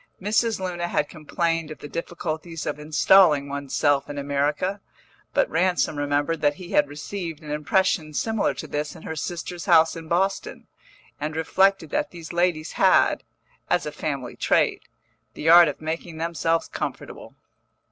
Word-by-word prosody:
Mrs. 215 Hz, +2 st, +1 dB
Luna 175 Hz, -2 st, -3 dB
had 150 Hz, -3 st, 0 dB
complained 165 Hz, 0 st, -2 dB
of 155 Hz, -, -8 dB
the -, -, -9 dB
difficulties 165 Hz, 0 st, -5 dB
of -, -, -3 dB
installing 150 Hz, -1 st, +4 dB
one's 140 Hz, -1 st, -5 dB
self 145 Hz, -1 st, +2 dB
in 145 Hz, -, -6 dB
America, 145 Hz, +7 st, -1 dB, 0.5 s
but -, -, +2 dB
Ransom 180 Hz, -, +1 dB
remembered 145 Hz, +2 st, -1 dB
that 145 Hz, -1 st, +2 dB
he 180 Hz, +1 st, -10 dB
had 150 Hz, -, +3 dB
received 160 Hz, +2 st, -6 dB
an 150 Hz, -, -7 dB
impression 155 Hz, +1 st, +1 dB
similar 225 Hz, +4 st, 0 dB
to -, -, -6 dB
this 150 Hz, 0 st, -4 dB
in -, -, -12 dB
her 160 Hz, -, -5 dB
sister's 175 Hz, +2 st, -5 dB
house 165 Hz, -3 st, +5 dB
in 165 Hz, -1 st, -8 dB
Boston, 190 Hz, +4 st, -1 dB, 0.5 s
and 155 Hz, +1 st, -3 dB
reflected 190 Hz, +4 st, +2 dB
that 300 Hz, 0 st, 0 dB
these 170 Hz, -1 st, -9 dB
ladies 175 Hz, -3 st, 0 dB
had, -, -, +4 dB, 0.5 s
as -, -, +1 dB
a -, -, -4 dB
family -, -, -4 dB
trait, -, -, +1 dB, 0.5 s
the 160 Hz, -, -1 dB
art 170 Hz, 0 st, +9 dB
of 145 Hz, -, -4 dB
making 160 Hz, +1 st, -5 dB
themselves 165 Hz, 0 st, 0 dB
comfortable. -, -, -6 dB
165 Hz, 155 wpm, -24 LUFS, 150-175 Hz, 0.5 s, art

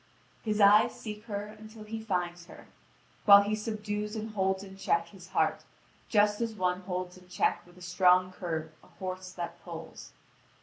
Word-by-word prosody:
His 215 Hz, -1 st, -1 dB
eyes 205 Hz, +1 st, +6 dB
seek 210 Hz, 0 st, -7 dB
her 205 Hz, -2 st, -3 dB
until 215 Hz, 0 st, -11 dB
he 220 Hz, +1 st, -5 dB
finds 175 Hz, -4 st, -2 dB
her, -, -, -13 dB, 0.6 s
while 200 Hz, -1 st, +10 dB
he 205 Hz, +1 st, -1 dB
subdues 210 Hz, 0 st, -3 dB
and 220 Hz, 0 st, -4 dB
holds 190 Hz, -1 st, 0 dB
in 195 Hz, -1 st, -11 dB
check 170 Hz, -3 st, 0 dB
his 185 Hz, -1 st, -13 dB
heart, -, -, +1 dB, 0.5 s
just 210 Hz, 0 st, +3 dB
as 230 Hz, -1 st, -2 dB
one 180 Hz, -2 st, 0 dB
holds 180 Hz, -1 st, -4 dB
in 180 Hz, -, -20 dB
check 180 Hz, -, 0 dB
with 175 Hz, 0 st, -19 dB
a 180 Hz, -, -12 dB
strong 180 Hz, +1 st, +4 dB
curb 160 Hz, -4 st, -4 dB
a -, -, -18 dB
horse 185 Hz, 0 st, -6 dB
that 175 Hz, -1 st, -6 dB
pulls. -, -, -9 dB
195 Hz, 175 wpm, -30 LUFS, 180-210 Hz, 0.6 s, while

